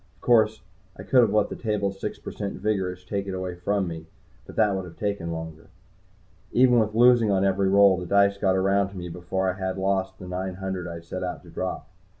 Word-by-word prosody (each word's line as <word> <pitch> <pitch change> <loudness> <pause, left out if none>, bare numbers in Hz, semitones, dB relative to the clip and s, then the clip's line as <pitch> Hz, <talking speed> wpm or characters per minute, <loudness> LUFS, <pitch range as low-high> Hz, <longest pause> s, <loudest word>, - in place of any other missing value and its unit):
Of - - -33
course, 110 -2 +3 0.4
I 95 - -8
could 125 +6 +4
have 115 -4 +3
let 105 -1 +2
the - - -5
table's 100 -3 -2
six - - -4
per - - -8
cent 100 -1 -5
vigorish 95 -3 -2
take 100 +1 -3
it 95 - -3
away 95 -1 -4
from 95 +2 -1
me, 80 -1 -7 0.4
but - - -11
that 105 -3 +3
would 95 -1 -3
have 85 - -12
taken 100 -5 -2
longer. 80 -1 -7 0.8
Even 125 -1 +5
with 110 -1 0
losing 120 -1 +5
on 95 -1 +2
every 95 0 +2
roll, 100 -1 +6
the 90 - -6
dice 100 +1 +3
got 95 -2 +2
around 95 +1 +2
to 100 - -11
me 90 -1 -6
before 90 +2 -2
I 95 - +1
had 95 0 -2
lost 95 0 -1
the 90 - -10
nine 90 +1 -4
hundred 95 -1 -4
I 85 - -6
had 85 0 -10
set 95 +2 -5
out 90 -1 -5
to - - -14
drop. - - -4
95 Hz, 235 wpm, -25 LUFS, 90-100 Hz, 0.8 s, roll